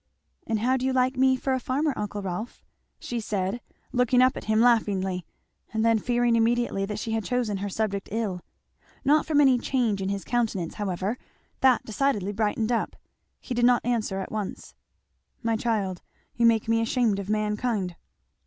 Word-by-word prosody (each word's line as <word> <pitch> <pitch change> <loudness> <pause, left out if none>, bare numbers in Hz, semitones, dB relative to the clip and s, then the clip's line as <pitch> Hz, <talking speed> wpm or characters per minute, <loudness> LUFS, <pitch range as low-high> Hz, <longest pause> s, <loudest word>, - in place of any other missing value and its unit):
"And 220 -2 0
how 255 +3 +2
do 260 - -2
you 265 - +1
like 255 +1 +2
me 260 0 +4
for 265 +1 -1
a 260 - +1
farmer, 280 +4 0
uncle 205 -1 -4
Rolf?" 195 +5 -5 0.3
she 240 - -4
said 205 +1 -2 0.3
looking 250 0 +3
up 255 +1 +5
at - - -7
him 215 0 +2
laughingly, 195 -6 +2 0.4
and 220 0 0
then 230 -1 +4
fearing 240 +1 +2
immediately 230 -3 +1
that 210 0 -4
she 225 +1 -4
had 225 -1 0
chosen 240 -5 -1
her 200 +1 -3
subject 200 -1 -2
ill. 205 -5 -2 0.6
Not 300 +3 +4
from 305 -2 +3
any 265 -4 +5
change 235 -6 0
in 190 - -1
his 200 -1 -2
countenance 220 -8 -1
however, 200 +3 -2 0.4
that 260 -3 +4
decidedly 220 -4 0
brightened 215 +2 0
up. 235 - -1 0.4
He 255 - -5
did 240 0 0
not 245 0 +4
answer 220 -5 0
at 190 - -5
once. 215 -3 -5 0.7
"My 230 0 +1
child 210 -5 -1 0.3
you 235 -1 +3
make 225 -2 +2
me 230 0 +2
ashamed 230 -3 +1
of 200 0 -6
mankind!" 210 -3 -1
225 Hz, 180 wpm, -26 LUFS, 205-245 Hz, 0.7 s, up